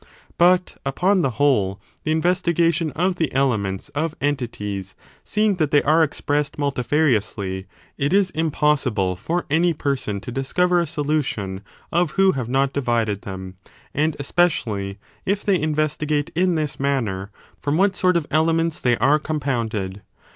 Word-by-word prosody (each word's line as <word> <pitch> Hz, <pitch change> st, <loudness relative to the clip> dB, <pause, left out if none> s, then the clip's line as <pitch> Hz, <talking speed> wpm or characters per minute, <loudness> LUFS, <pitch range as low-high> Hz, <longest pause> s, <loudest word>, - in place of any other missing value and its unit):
But, 180 Hz, +1 st, +4 dB
upon 180 Hz, +8 st, +2 dB
the 135 Hz, -, +2 dB
whole, 105 Hz, -9 st, +2 dB, 0.3 s
the 155 Hz, -, +1 dB
investigation 170 Hz, 0 st, +2 dB
of 180 Hz, +2 st, 0 dB
the 160 Hz, -3 st, 0 dB
elements 110 Hz, -6 st, 0 dB
of 155 Hz, +2 st, -2 dB
entities, 105 Hz, -9 st, -3 dB, 0.3 s
seeing 210 Hz, -2 st, +1 dB
that 155 Hz, -4 st, +1 dB
they 145 Hz, -1 st, +4 dB
are 155 Hz, +3 st, +4 dB
expressed 145 Hz, -1 st, 0 dB
multifariously, 125 Hz, -9 st, 0 dB, 0.3 s
it 140 Hz, +2 st, +1 dB
is 195 Hz, -1 st, +3 dB
impossible 145 Hz, -, +1 dB
for 170 Hz, -, -2 dB
any 165 Hz, +2 st, +3 dB
persons 130 Hz, -9 st, -2 dB
to -, -, -6 dB
discover 175 Hz, +8 st, +1 dB
a 170 Hz, -, 0 dB
solution 145 Hz, -, -2 dB, 0.3 s
of 170 Hz, -1 st, +1 dB
who 195 Hz, 0 st, +5 dB
have 125 Hz, -6 st, -4 dB
not 135 Hz, +1 st, +1 dB
divided 115 Hz, -6 st, 0 dB
them; 95 Hz, -1 st, -8 dB, 0.4 s
and, 155 Hz, +1 st, +1 dB
especially, 115 Hz, -, 0 dB, 0.3 s
if 200 Hz, +1 st, -1 dB
they 195 Hz, -3 st, +3 dB
investigate 150 Hz, -1 st, 0 dB
in 180 Hz, +1 st, +2 dB
this 155 Hz, -3 st, -2 dB
manner 115 Hz, -9 st, -1 dB, 0.3 s
from 145 Hz, +2 st, 0 dB
what 195 Hz, +1 st, +3 dB
sort 180 Hz, -2 st, +3 dB
of 165 Hz, -, -2 dB
elements 165 Hz, +1 st, +2 dB
they 120 Hz, -2 st, +2 dB
are 150 Hz, +2 st, +4 dB
compounded. 115 Hz, -11 st, -2 dB
145 Hz, 145 wpm, -22 LUFS, 120-165 Hz, 0.4 s, who